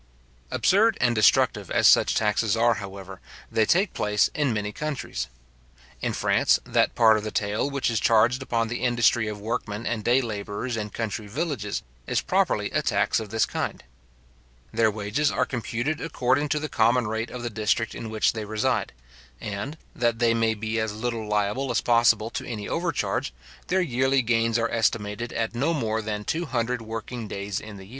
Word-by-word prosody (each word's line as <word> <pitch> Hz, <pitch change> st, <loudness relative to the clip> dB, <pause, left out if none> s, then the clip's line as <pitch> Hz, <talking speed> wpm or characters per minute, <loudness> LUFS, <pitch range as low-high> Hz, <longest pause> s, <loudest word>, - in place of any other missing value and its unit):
Absurd 220 Hz, +4 st, +3 dB
and 120 Hz, -1 st, +3 dB
destructive 110 Hz, -3 st, +3 dB
as -, -, +2 dB
such -, -, +6 dB
taxes 110 Hz, 0 st, +1 dB
are, 120 Hz, +1 st, +4 dB
however, 95 Hz, -3 st, -8 dB, 0.3 s
they 110 Hz, -1 st, +2 dB
take 190 Hz, +3 st, +2 dB
place 105 Hz, 0 st, +2 dB
in 145 Hz, -4 st, +1 dB
many 105 Hz, -1 st, -2 dB
countries. 140 Hz, -, -4 dB, 0.7 s
In -, -, 0 dB
France, -, -, +3 dB
that -, -, +1 dB
part 110 Hz, -2 st, +6 dB
of 105 Hz, -, -4 dB
the 110 Hz, -, -3 dB
taille 105 Hz, +6 st, -1 dB
which 140 Hz, -3 st, -1 dB
is 115 Hz, -, +1 dB
charged 115 Hz, +3 st, +3 dB
upon 115 Hz, -3 st, 0 dB
the 120 Hz, +2 st, -4 dB
industry 120 Hz, -2 st, +2 dB
of 105 Hz, -1 st, -5 dB
workmen 110 Hz, 0 st, -4 dB
and 110 Hz, -3 st, -2 dB
day 120 Hz, +4 st, +4 dB
labourers 110 Hz, 0 st, -4 dB
in 105 Hz, -1 st, -3 dB
country 110 Hz, -1 st, -4 dB
villages, 125 Hz, -, -3 dB, 0.2 s
is -, -, +1 dB
properly -, -, 0 dB
a -, -, +1 dB
tax -, -, +1 dB
of 110 Hz, -2 st, -7 dB
this 110 Hz, +1 st, +2 dB
kind. -, -, -4 dB, 0.9 s
Their 110 Hz, 0 st, +3 dB
wages 110 Hz, +8 st, 0 dB
are -, -, +1 dB
computed 125 Hz, +4 st, -3 dB
according 145 Hz, -2 st, 0 dB
to 150 Hz, -, +1 dB
the 155 Hz, -, -3 dB
common 120 Hz, -1 st, +2 dB
rate 110 Hz, +2 st, -2 dB
of 125 Hz, -1 st, -7 dB
the 120 Hz, -, -3 dB
district 110 Hz, +1 st, 0 dB
in 115 Hz, -, -6 dB
which 110 Hz, -1 st, +1 dB
they 110 Hz, -2 st, -4 dB
reside; 105 Hz, 0 st, -1 dB, 0.5 s
and, 105 Hz, +9 st, -5 dB, 0.2 s
that 120 Hz, -2 st, +1 dB
they 115 Hz, -1 st, +3 dB
may 115 Hz, -1 st, +1 dB
be 110 Hz, +2 st, -2 dB
as 110 Hz, -1 st, -1 dB
little 115 Hz, 0 st, -3 dB
liable 105 Hz, +6 st, 0 dB
as 120 Hz, -, +2 dB
possible 115 Hz, -2 st, +3 dB
to -, -, -4 dB
any 105 Hz, -4 st, -5 dB
overcharge, 165 Hz, -, -1 dB, 0.3 s
their 190 Hz, +1 st, +2 dB
yearly 130 Hz, -3 st, +2 dB
gains 115 Hz, 0 st, +2 dB
are 115 Hz, 0 st, 0 dB
estimated 110 Hz, 0 st, -1 dB
at 115 Hz, 0 st, -2 dB
no 145 Hz, +8 st, 0 dB
more 110 Hz, -5 st, -1 dB
than 105 Hz, -1 st, -4 dB
two 165 Hz, +1 st, -2 dB
hundred 125 Hz, -1 st, -1 dB
working 115 Hz, +1 st, -6 dB
days 100 Hz, -1 st, -4 dB
in 105 Hz, -2 st, -10 dB
the 95 Hz, -, -11 dB
year. -, -, -17 dB
115 Hz, 185 wpm, -25 LUFS, 105-125 Hz, 0.9 s, such